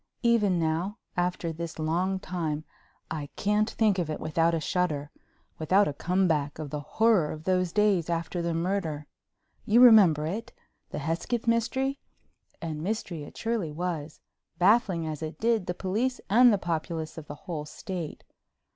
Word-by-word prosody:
Even 215 -6 +3
now, 165 +6 -1 0.2
after 175 -2 -1
this 165 +1 -6
long 175 +5 0
time, 160 -5 -3 0.5
I 150 -3 -4
can't 210 +2 +1
think 210 -5 +2
of 170 -3 -1
it 155 - -3
without 165 +2 +1
a - - 0
shudder, 155 -4 -1 0.5
without 185 +6 +3
a 145 - -2
comeback 160 -3 0
of 155 -3 -6
the 150 - -3
horror 190 +2 +2
of 155 0 -7
those 185 -1 +1
days 200 -4 +2
after 170 +1 -2
the 170 -1 -1
murder. 165 -4 -2 0.6
You 220 +3 +4
remember 200 -11 +7
it—the 205 +8 -7
Hesketh 170 - -2
mystery? 260 +4 0 0.6
And 155 -2 -4
mystery 185 -3 -3
it 145 - -10
surely 225 -9 -1
was, 160 -2 -4 0.4
baffling, 190 -2 +3
as 155 -1 -4
it 155 0 -5
did, 225 -4 +1
the 180 - -2
police 225 +9 -1
and 245 +3 +7
the 205 - +3
populace 165 -2 -3
of 150 - -12
the 145 - -7
whole 160 -5 -4
state. 170 +1 -6
175 Hz, 155 wpm, -28 LUFS, 160-205 Hz, 0.6 s, remember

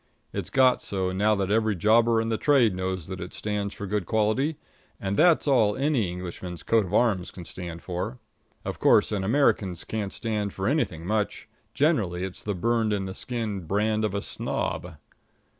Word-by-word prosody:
It's - - -3
got 130 -2 +4
so 95 -2 -2
now 105 +3 +2
that 100 -1 -1
every 110 -1 +2
jobber 115 +5 +4
in 115 0 -1
the 110 - 0
trade 130 -8 +4
knows 95 -2 -3
that 95 +1 -6
it 90 - -7
stands 105 -1 -3
for 100 - -6
good 100 -2 -2
quality, 110 +8 +1 0.4
and 100 0 -2
that's 170 +4 +4
all 110 -7 +4
any 135 - +1
Englishman's 90 0 -6
coat 115 -3 +3
of - - -9
arms 105 -7 +2
can 90 - -10
stand 85 -2 -7
for. 90 -8 -4 0.5
Of - - -4
course, - - +4
an 100 -3 -1
American's 100 - +1
can't 105 -3 -3
stand 105 -3 -2
for 95 +1 -2
anything 120 - 0
much 105 +2 -1 0.3
generally 105 - +1
it's 95 -1 -5
the 105 -2 -3
burned 115 +2 +1
in 100 -2 -1
the 95 - -5
skin 105 -7 -4
brand 105 +3 +1
of 105 -2 -1
a 100 - -2
snob. 90 -2 -3
105 Hz, 185 wpm, -26 LUFS, 95-115 Hz, 0.5 s, got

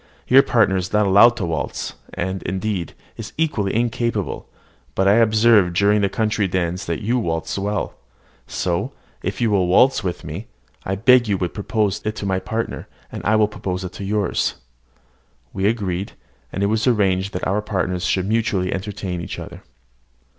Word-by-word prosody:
Your 135 +2 +8
partner 105 -8 +2
is 90 0 -3
not 105 0 +3
allowed 105 +5 +6
to 105 - -2
waltz, 80 -2 -3 0.2
and, 95 +1 -3
indeed, 95 -2 -3 0.2
is 115 - -7
equally 130 -12 0
incapable: 115 -3 -1 0.5
but 95 - +2
I 100 +3 +5
observed 110 -5 +4
during 100 +2 +3
the 100 - +2
country 105 -2 0
dance 90 +1 -2
that 85 +1 -3
you 120 +4 +1
waltz 80 -6 -2
well; 100 +1 -2 0.5
so, 85 -2 -2 0.3
if - - -3
you 115 -2 +2
will 95 -3 +2
waltz 125 +7 +4
with 90 -2 -3
me, - - -7 0.4
I 95 - -1
beg 120 +4 +5
you 100 -2 +1
would 90 -2 -3
propose 105 -1 -1
it 110 0 -2
to 105 - -5
my 95 -1 0
partner, 110 +5 -4 0.2
and - - -7
I 110 - +3
will 110 -1 +4
propose 95 -3 -4
it 90 - -6
to - - -7
yours." 100 -1 0 1.0
We 95 +1 0
agreed, 100 -4 -2 0.4
and 100 - -2
it - - +4
was 110 +4 +1
arranged 100 -4 +2
that 90 - -3
our 100 +3 +1
partners 95 -3 -2
should 95 0 +1
mutually 105 -4 0
entertain 95 -2 -4
each - - -6
other. - - -9
100 Hz, 175 wpm, -21 LUFS, 95-110 Hz, 1.0 s, Your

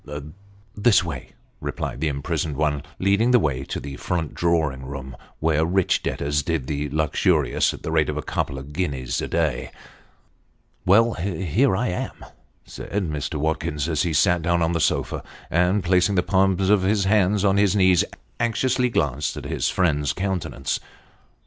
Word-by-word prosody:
" 100 +1 -28
This 105 -2 +4
way," 75 -7 -6 0.3
replied 65 - -4
the 80 - +1
imprisoned 75 0 -2
one, 75 -2 0 0.2
leading 100 +5 +2
the 125 - +6
way 70 - 0
to - - -4
the 70 -1 -7
front 85 -4 -2
drawing 80 -6 0
room, 65 -1 -7 0.2
where 80 0 +2
rich 90 +2 +2
debtors 75 +1 -1
did 80 -3 -2
the 75 +1 -2
luxurious 75 +1 +1
at - - -10
the - - -3
rate 80 -1 +2
of 75 - -2
a 75 - -3
couple 70 - -2
of 70 +3 -9
guineas 70 -8 -2
a - - -3
day. 80 -7 -1 0.6
" - - -41
Well, 115 +5 +5
here 95 - 0
I 125 +5 0
am," 90 - -5 0.4
said - - -9 0.2
Mr. 75 +1 -3
Watkins, 75 -1 -1
as 80 -3 0
he 85 - 0
sat 85 +3 +3
down 85 0 +1
on 80 - +1
the 85 - 0
sofa; 80 - 0 0.3
and 90 +4 +2
placing 90 +2 +3
the 90 - +3
palms 95 0 +2
of 105 -2 +5
his 100 +2 +2
hands 100 0 +2
on 100 0 +3
his 100 0 +3
knees, 95 -3 +5 0.4
anxiously 125 +2 +1
glanced 75 - -1
at - - -7
his - - -1
friend's 75 -6 +1
countenance. 95 -7 -2
85 Hz, 175 wpm, -23 LUFS, 75-95 Hz, 0.6 s, the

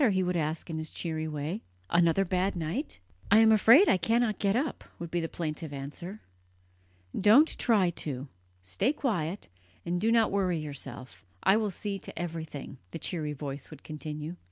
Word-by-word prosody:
he 190 -2 +2
would 180 0 -1
ask 155 -1 -2
in 160 -2 -4
his 155 -1 -5
cheery 160 -2 -3
way 155 +7 -3 0.3
"another 170 +3 +4
bad 185 +2 0
night?" 175 - -3 0.3
"I 210 - +7
am 220 0 +7
afraid 230 - +7
I - - +5
cannot 225 +3 +1
get 200 0 +2
up," 275 +2 -1
would 170 -1 -7
be 175 - +1
the 165 -1 -2
plaintive 155 -2 -4
answer. 150 +9 -7 0.9
"Don't 230 +11 +6
try 205 -7 +3
to; 140 -4 -4 0.4
stay 95 - 0
quiet, 200 - -2 0.4
and 175 +1 -1
do 225 +2 +3
not 230 -1 +4
worry 190 -3 +1
yourself 140 -6 -7 0.2
I 190 - +5
will 215 -1 +1
see 200 +1 -4
to - - -11
everything," 160 -6 -5
the - - -6
cheery 155 -3 -3
voice 140 -1 -6
would 155 -3 -12
continue. 155 +2 -6
175 Hz, 175 wpm, -29 LUFS, 155-205 Hz, 0.9 s, I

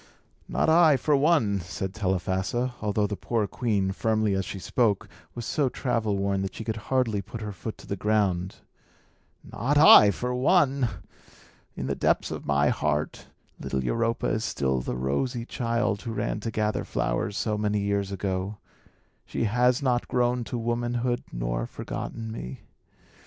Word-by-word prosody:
"Not - - 0
I, 160 -3 +6
for 150 +2 +2
one," 140 -9 +3
said 90 +2 -5
Telephassa; 95 +4 -1
although 105 0 +1
the 105 0 -2
poor 115 +1 -1
queen, 100 -3 0
firmly 110 0 +1
as 95 0 -1
she - - -6
spoke, 105 +1 0 0.3
was 120 -1 -5
so 140 -1 +1
travel 115 -6 -1
worn 100 0 0
that 95 -1 -4
she - - -5
could 110 0 -3
hardly 125 -6 +1
put 105 +4 -8
her 105 -1 -4
foot 110 +2 -7
to - - -14
the 100 - -3
ground 100 -3 0 0.9
"not 135 +7 -1
I, 145 -8 +9
for 125 +5 -2
one! 135 -2 +3 0.9
In - - -4
the - - -1
depths - - +1
of - - -6
my 70 0 +3
heart, 75 0 -1 0.3
little 65 -1 -2
Europa 115 - 0
is 110 - 0
still 65 - 0
the 60 - -3
rosy 115 - -1
child 115 -4 -1
who 115 - -5
ran 110 - -2
to 115 - -4
gather 105 -1 -1
flowers 100 +1 -2
so 110 -2 0
many 105 0 0
years 100 -1 -1
ago. 95 +1 -3 0.7
She - - -3
has 125 +4 +2
not 125 -2 +1
grown 125 0 +1
to 125 - -4
womanhood, 120 +1 -1
nor - - -2
forgotten 115 -1 -6
me. 65 - -7
110 Hz, 165 wpm, -26 LUFS, 95-120 Hz, 0.9 s, I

